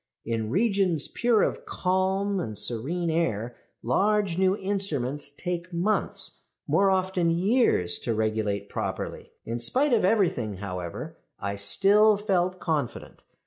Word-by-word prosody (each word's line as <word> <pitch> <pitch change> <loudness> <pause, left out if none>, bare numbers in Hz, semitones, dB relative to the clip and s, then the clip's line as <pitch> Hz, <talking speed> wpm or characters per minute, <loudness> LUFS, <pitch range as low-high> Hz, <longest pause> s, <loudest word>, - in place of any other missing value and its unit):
"In 110 -1 -2
regions 190 - +1
pure 235 -3 +2
of - - -2
calm 190 +2 0
and 110 - -4
serene 160 - 0
air 120 -8 -1 0.3
large 200 - +1
new 190 +2 +2
instruments 155 -9 -2
take 175 +4 -5
months, 180 +5 -2 0.2
more 195 0 +3
often 185 -2 +1
years, 175 - +2
to 115 - -2
regulate 105 -2 -1
properly. - - -5
"In 115 +1 -3
spite 260 - +1
of 225 - +3
everything, 180 - +1
however, 90 -3 -6 0.2
I 100 +1 -3
still 200 - +4
felt 185 -3 0
confident. 150 -7 -3
175 Hz, 125 wpm, -26 LUFS, -, 0.3 s, still